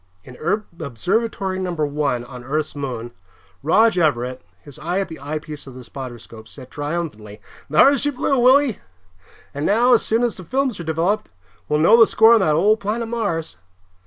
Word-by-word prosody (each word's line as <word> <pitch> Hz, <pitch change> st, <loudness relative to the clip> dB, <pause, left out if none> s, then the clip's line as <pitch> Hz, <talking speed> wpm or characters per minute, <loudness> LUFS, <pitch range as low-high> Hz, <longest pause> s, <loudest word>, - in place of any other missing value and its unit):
In 125 Hz, -, -13 dB, 0.4 s
Observatory 190 Hz, -, -2 dB
No. 180 Hz, -2 st, -3 dB
1 145 Hz, -5 st, -1 dB
on 125 Hz, 0 st, -10 dB
Earth's 150 Hz, +4 st, -2 dB
moon, 125 Hz, -4 st, -5 dB, 0.5 s
Rog 185 Hz, +6 st, +3 dB
Everett, 130 Hz, -5 st, 0 dB, 0.2 s
his 145 Hz, -3 st, -13 dB
eye 175 Hz, +4 st, -2 dB
at 195 Hz, -, -2 dB
the 160 Hz, -, -9 dB
eyepiece 150 Hz, 0 st, -6 dB
of 130 Hz, -, -11 dB
the 130 Hz, -, -10 dB
spotter 130 Hz, -1 st, -8 dB
scope, 110 Hz, -1 st, -13 dB
said 130 Hz, +1 st, -12 dB
triumphantly, 145 Hz, -9 st, -5 dB, 0.3 s
"Thar 270 Hz, -, +6 dB
she 290 Hz, -, +1 dB
blew, 275 Hz, -1 st, 0 dB
Willie. 255 Hz, -1 st, +4 dB, 0.7 s
And 145 Hz, -, -4 dB
now, 235 Hz, +8 st, +4 dB
as 235 Hz, -, +5 dB
soon 225 Hz, +2 st, +1 dB
as 240 Hz, -3 st, -1 dB
the 185 Hz, -, -8 dB
films 260 Hz, -, -1 dB
are -, -, -5 dB
developed, 165 Hz, +6 st, -1 dB, 0.4 s
we'll 150 Hz, -, +2 dB
know 170 Hz, +9 st, +6 dB
the 230 Hz, -, +7 dB
score 225 Hz, +1 st, +6 dB
on 230 Hz, -, +5 dB
that 155 Hz, -6 st, +2 dB
old 210 Hz, +7 st, +3 dB
planet 225 Hz, +3 st, -3 dB
Mars." 185 Hz, -, -3 dB
165 Hz, 180 wpm, -21 LUFS, 140-220 Hz, 0.7 s, the